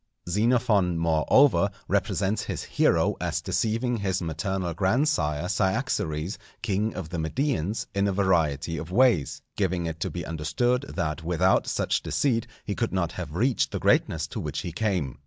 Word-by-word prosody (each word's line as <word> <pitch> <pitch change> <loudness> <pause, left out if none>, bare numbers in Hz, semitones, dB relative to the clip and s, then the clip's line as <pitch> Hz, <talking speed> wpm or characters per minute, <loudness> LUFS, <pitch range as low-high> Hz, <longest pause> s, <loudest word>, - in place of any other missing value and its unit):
Xenophon, 105 -2 +2
moreover, 85 - +4 0.2
represents 100 +2 0
his - - -4
hero - - +2
as - - -1
deceiving 115 +2 0
his 95 -3 -1
maternal 85 +2 -2
grandsire 90 - +1
Cyaxares, 95 - -1 0.2
king 105 +2 0
of 90 -4 -5
the 85 - -4
Medians, 105 - -1
in 100 +1 +1
a - - +1
variety 80 -5 +1
of 80 - -6
ways; 115 - +2
giving 90 -3 0
it 80 -1 -4
to - - -2
be 85 -3 -5
understood 120 - 0
that 80 -2 -2
without 90 +2 +2
such - - 0
deceit 120 -4 0 0.2
he 105 - -2
could 115 0 -2
not 85 -3 0
have 85 -4 -6
reached 125 +6 +2
the - - -3
greatness - - +2
to - - -5
which - - -3
he 85 - -5
came. 90 - -1
95 Hz, 155 wpm, -26 LUFS, 80-110 Hz, 0.2 s, moreover